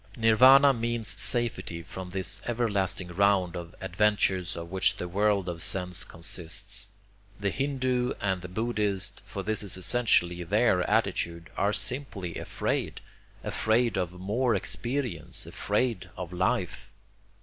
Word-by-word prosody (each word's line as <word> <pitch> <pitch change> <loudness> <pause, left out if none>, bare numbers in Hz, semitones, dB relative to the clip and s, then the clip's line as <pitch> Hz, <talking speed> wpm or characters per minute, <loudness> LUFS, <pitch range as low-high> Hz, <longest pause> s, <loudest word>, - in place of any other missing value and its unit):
Nirvana 130 +5 +7
means 115 -2 -2
safety 120 -9 -1
from 90 +3 -8
this 95 +2 -2
everlasting 100 -6 0
round 95 -1 +2
of 85 0 -7
adventures 95 -1 +1
of 85 0 -7
which 95 0 +2
the 90 - -4
world 100 +1 +1
of 85 -1 -4
sense 90 +1 0
consists. 90 +4 -4 0.5
The 100 -1 0
hindoo 130 -2 0
and 95 -2 -1
the 90 - -6
buddhist, 105 0 0
for 100 - -5
this 110 +2 -1
is 100 -2 -2
essentially 90 -4 +2
their 95 +1 +3
attitude, 85 -6 0
are 100 +1 +2
simply 105 -8 -2
afraid, - - -2 0.4
afraid 115 +1 +1
of 90 -2 -1
more 110 +5 +1
experience, 125 +6 -2
afraid 105 -1 -1
of 90 -1 -6
life. 90 +1 -1
100 Hz, 125 wpm, -28 LUFS, 90-115 Hz, 0.5 s, Nirvana